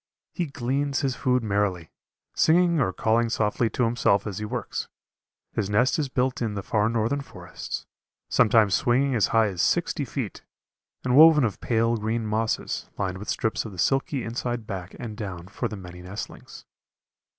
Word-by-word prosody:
He 175 -3 -2
gleans 140 +2 -1
his 135 -3 0
food 125 -2 +1
merrily, 100 -6 -1 0.4
singing 170 0 +4
or 125 -8 +2
calling 115 +3 +1
softly 110 +1 +1
to 125 - -1
himself 115 -4 +2
as 105 -2 -4
he 105 - -3
works. 120 0 -4 0.7
His 105 -3 -1
nest 125 +8 +2
is 145 -3 -1
built 125 0 0
in 110 -3 -1
the 100 - -4
far 105 +2 +1
northern 115 +5 0
forests, - - -7 0.4
sometimes 110 -3 +4
swinging 130 +6 +2
as 110 -5 +3
high 110 -2 +3
as 90 -3 -2
sixty - - +1
feet, - - -5 0.6
and 125 0 +1
woven 155 -1 +8
of 110 -6 -1
pale 115 0 +1
green 110 +1 -2
mosses, 110 +1 -2
lined 95 -2 -2
with 105 - -7
strips 110 - 0
of 110 - -8
the - - -11
silky 135 - +1
inside 120 0 -3
back 95 -3 -6
and 115 -3 -6
down 95 -5 -6
for 110 +5 -3
the 105 -1 -7
many 90 -1 -10
nestlings. 90 +3 -8
115 Hz, 175 wpm, -25 LUFS, 105-125 Hz, 0.7 s, woven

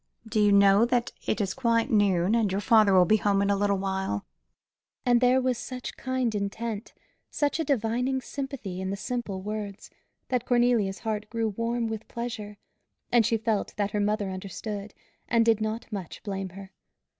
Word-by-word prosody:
Do 220 0 0
you 205 0 +5
know 200 +1 +6
that 240 0 0 0.2
it - - 0
is 195 -2 0
quite 230 -3 +1
noon, 200 -3 +3
and 225 -4 +2
your 195 - 0
father 210 -1 +5
will 180 -1 +7
be 215 +5 +4
home 200 -1 +2
in 200 - +2
a - - +3
little 200 0 +1
while?" 190 - -2 0.8
And 245 -1 +4
there 250 +1 +5
was 255 -2 0
such 250 0 -6
kind 260 -3 -1
intent, 210 +2 -4 0.3
such 290 +2 0
a - - +2
divining 250 -1 0
sympathy 260 -9 -5
in 190 - -3
the 200 - -3
simple 210 -5 -4
words, 210 -1 -5 0.4
that 250 -2 -1
Cornelia's 240 -5 +2
heart 215 -2 -3
grew 225 -1 -1
warm 230 +3 -1
with 225 -1 -4
pleasure; 220 -3 -5 0.5
and 235 -3 +5
she 230 - +2
felt 220 -2 -1
that 205 -1 0
her 210 - -1
mother 205 -1 0
understood, 200 +2 -6 0.3
and 230 -1 +4
did 225 -2 +3
not 220 +1 -2
much 195 -5 -6
blame 195 -3 -4
her. 190 +1 -11
215 Hz, 180 wpm, -27 LUFS, 200-235 Hz, 0.8 s, will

